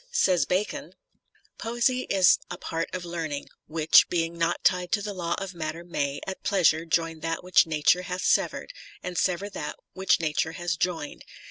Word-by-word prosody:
Says 185 - +3
Bacon: 190 +3 -2 0.7
Poesy 240 +2 0
is 190 -2 +5
a - - -5
part 165 0 -3
of 180 -1 -5
learning... 165 -4 -4 0.2
which, 160 0 +5
being 170 -1 -1
not 170 0 0
tied 180 -1 +2
to 205 - +2
the 205 0 -4
law 170 -2 -2
of 195 -1 -5
matter 165 0 -5
may, 140 -5 -2
at 190 - -6
pleasure 170 -4 +2
join 165 -1 0
that 165 +2 -3
which 180 -2 +4
Nature 155 +3 +3
hath 180 0 -4
severed - - +1 0.3
and 180 0 -5
sever 185 +3 0
that 150 - -5 0.2
which 190 -2 +2
Nature 160 0 -1
hath 175 -1 -3
joined. 165 -5 -2
175 Hz, 170 wpm, -26 LUFS, 165-185 Hz, 0.7 s, is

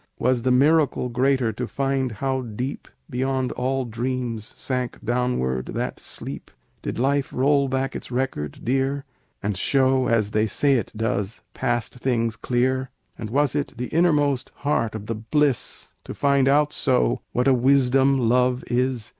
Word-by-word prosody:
"Was 125 0 +1
the 130 - 0
miracle 140 0 +3
greater 125 -1 +1
to 120 +3 -4
find 135 -2 -1
how 130 +3 -1
deep 125 +3 -5 0.2
Beyond 130 -2 -1
all 130 +1 -1
dreams 120 -1 -3
sank 125 -2 -3
downward 115 - 0
that - - -3
sleep? - - -7 0.3
"Did - - -4
life 135 +3 +1
roll 140 +1 +2
back 135 0 -1
its - - -6
record 125 - -3
dear, 135 +3 0 0.4
And 100 0 -1
show, 130 +5 +2
as 110 -3 +1
they 110 +1 +2
say 140 +6 +2
it 120 - 0
does, 105 -1 -2
past 120 +1 -2
things 115 -3 0
clear? 130 +3 0 0.3
"And 110 - -6
was 140 +3 +2
it 145 -3 -2
the 125 +1 -4
innermost 145 -6 +2
heart 115 -6 +1
of 105 -1 -6
the 115 - -2
bliss 125 +4 -1
To - - -7
find 140 -2 +3
out 145 +2 +3
so, 130 -3 +1
what 125 +2 +1
a 135 - +6
wisdom 135 +1 +4
love 125 +1 +2
is? 125 -2 0
130 Hz, 155 wpm, -24 LUFS, 120-135 Hz, 0.4 s, a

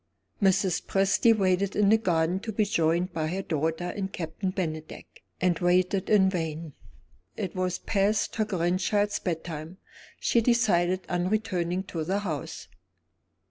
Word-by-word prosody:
Mrs. 190 -2 +2
Presty 195 +4 +3
waited 195 -2 +1
in 205 -1 +3
the 220 - +6
garden 175 -2 +1
to 220 +2 -5
be 215 0 +1
joined 175 -2 +1
by 155 -1 -1
her 190 +4 -3
daughter 160 0 -1
and 195 -1 -3
Captain 170 +3 -4
Bennydeck, 155 -5 -6 0.2
and 180 -2 +1
waited 185 +2 +2
in 200 -3 +5
vain. 160 -4 -3 0.6
It 195 -4 -4
was 185 -1 -1
past 205 +2 0
her 215 - +2
grandchild's 195 +2 0
bedtime; 165 -1 -5 0.4
she 235 - +2
decided 190 -6 +2
on 180 0 -1
returning 185 -4 -1
to 165 -4 -4
the 190 +5 -1
house. 160 -8 -5
185 Hz, 140 wpm, -27 LUFS, 170-200 Hz, 0.6 s, the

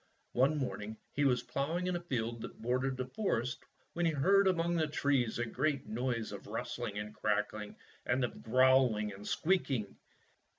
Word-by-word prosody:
One 135 +5 +3
morning 110 -5 -3 0.2
he 145 - +1
was 125 -3 +3
ploughing 165 +6 -1
in 180 -1 0
a - - -1
field 120 -7 -2
that - - -8
bordered 125 +3 0
the 130 - -2
forest 130 - -1 0.3
when 175 - -1
he - - +3
heard 195 +7 +4
among 170 -2 +2
the 160 -2 +2
trees 140 -6 +1
a 120 - 0
great 135 +4 -1
noise 115 0 -2
of 100 - -8
rustling 115 -1 -4
and 105 0 -4
crackling 105 0 -1 0.3
and 130 +1 +1
of 120 - -3
growl 130 -1 +5
ing 105 -1 -2
and 100 +1 -9
squeaking. 140 - 0
130 Hz, 175 wpm, -33 LUFS, 110-145 Hz, 0.3 s, growl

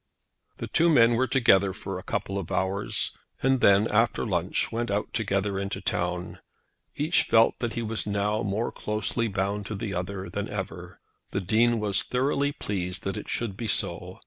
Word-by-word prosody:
The - - -4
two 170 +1 +3
men 120 -7 +6
were 130 +3 +2
together 100 -7 +4
for 95 -1 -5
a - - -11
couple 100 0 -2
of 95 -1 -7
hours, 95 +2 -1 0.3
and 135 -1 +3
then, 100 +2 +5
after 115 +2 +2
lunch, - - 0
went 115 +1 -2
out 100 +1 -2
together 100 -2 0
into 100 +1 -3
the - - -10
town. 90 0 -2 0.6
Each 155 +4 +2
felt 115 0 +4
that 120 -2 -2
he 120 - -2
was 110 -1 -3
now 105 +1 0
more 105 +3 -1
closely 110 +2 -1
bound 100 0 -2
to 110 - -4
the 100 0 -4
other 95 +1 -4
than - - -4
ever. - - -6 0.3
The 95 - -2
Dean 115 +5 +3
was 105 0 +1
thoroughly 140 +3 0
pleased 95 -7 -3
that 95 -1 -2
it - - -7
should 115 -5 -2
be 115 +3 -4
so. - - -2
105 Hz, 185 wpm, -27 LUFS, 95-115 Hz, 0.6 s, men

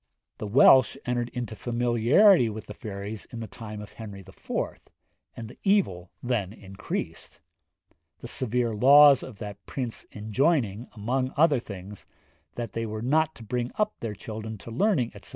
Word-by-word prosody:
The 105 - -4
Welsh 130 +3 +6
entered 120 -1 -1
into 120 -2 -5
familiarity 120 - +4
with 110 0 -7
the 105 - -8
fairies 105 0 -7
in 120 - -9
the 115 - -4
time 105 -2 -8
of 105 - -10
Henry 105 -3 -9
IV., 95 0 -18 0.9
and 115 - -6
the 115 - -14
evil 175 - +1
then 115 -6 -1
increased; 95 -3 -6 0.8
the - - -9
severe 120 -1 -1
laws 140 +5 +7
of 120 -6 -9
that 100 -1 -8
prince 125 -4 -4
enjoining, 110 - 0
among 130 +5 -1
other 150 -3 +4
things, 100 -2 -10 0.5
that 115 -3 -5
they 115 0 -2
were 110 +1 -5
not 155 +5 +2
to 115 - -11
bring 120 +2 -2
up 210 0 0
their 110 -3 -4
children 110 +1 -7
to 115 - -10
learning, 130 - +1
etc. - - -10
115 Hz, 160 wpm, -27 LUFS, 105-130 Hz, 0.9 s, laws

